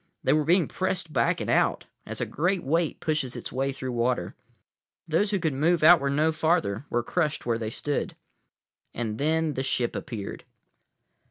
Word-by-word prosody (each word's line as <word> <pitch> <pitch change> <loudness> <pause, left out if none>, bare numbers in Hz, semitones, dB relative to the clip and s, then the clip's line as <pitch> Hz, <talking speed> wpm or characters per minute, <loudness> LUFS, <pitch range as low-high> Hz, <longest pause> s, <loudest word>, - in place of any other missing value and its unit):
They - - +3
were 155 0 +3
being 170 +3 +3
pressed 180 -4 -2
back - - +2
and - - -4
out, - - +2 0.2
as - - -4
a - - 0
great 180 +4 0
weight 160 +3 0
pushes 150 -5 -1
its - - -6
way 135 +2 -1
through 130 -1 -5
water. 120 +1 0 0.7
Those 165 +6 +2
who 200 - +1
could 160 -5 -1
move 160 +4 +2
outward 155 -4 +6
no 155 +3 +3
farther 155 - 0
were 120 0 0
crushed 155 +3 -1
where 115 -1 0
they 110 -1 -3
stood. 145 +5 -3 0.8
And 110 -2 -3
then 160 +1 +1
the 130 - -2
ship 125 -2 -1
appeared. 105 -5 -6
150 Hz, 175 wpm, -26 LUFS, 125-165 Hz, 0.8 s, outward